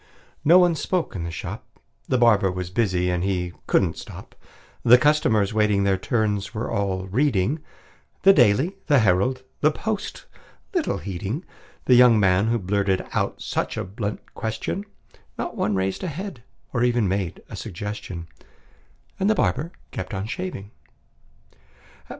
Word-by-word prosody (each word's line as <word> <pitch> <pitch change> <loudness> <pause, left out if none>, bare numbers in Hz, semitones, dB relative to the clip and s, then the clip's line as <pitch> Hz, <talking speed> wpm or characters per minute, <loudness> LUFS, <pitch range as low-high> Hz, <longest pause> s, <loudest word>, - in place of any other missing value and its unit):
No 170 +5 +7
one 175 -2 +5
spoke 170 - -2
in 85 -3 -3
the - - -4
shop: 85 - -8 0.3
The 130 - +2
barber 105 -6 +4
was 90 -1 -5
busy, 90 -4 +1
and 90 0 -1
he 90 -2 -1
couldn't - - +2
stop; - - -10 0.5
The 125 +1 +7
customers, 125 -8 +2
waiting 105 -2 +2
their 100 -1 +3
turns, 105 0 -1
were 110 - -3
all 95 -2 -1
reading 120 - +1 0.6
The 195 - +8
"Daily," 135 - +3
the 145 - +5
"Herald," 115 +5 +2 0.2
the 150 - +4
"Post," 210 +6 -4 0.5
little 355 -5 0
heeding 100 - -4 0.4
The 125 - +5
young 120 -2 +7
man 95 +1 +3
who 115 +1 +2
blurted 95 -1 0
out - - -1
such - - -2
a - - -1
blunt 100 +2 -6
question; 115 - -3 0.5
Not - - -4
one 105 0 0
raised 95 - -1
a - - -1
head, 175 - -6 0.3
or 120 - 0
even 120 -3 +2
made 95 -2 -2
a - - -8
suggestion; 90 -3 -6 0.9
And 195 +2 +2
the 220 - +4
barber 140 - 0 0.2
kept 95 +2 -5
on 95 +1 -3
shaving. 115 - -5
105 Hz, 150 wpm, -24 LUFS, 95-135 Hz, 0.9 s, The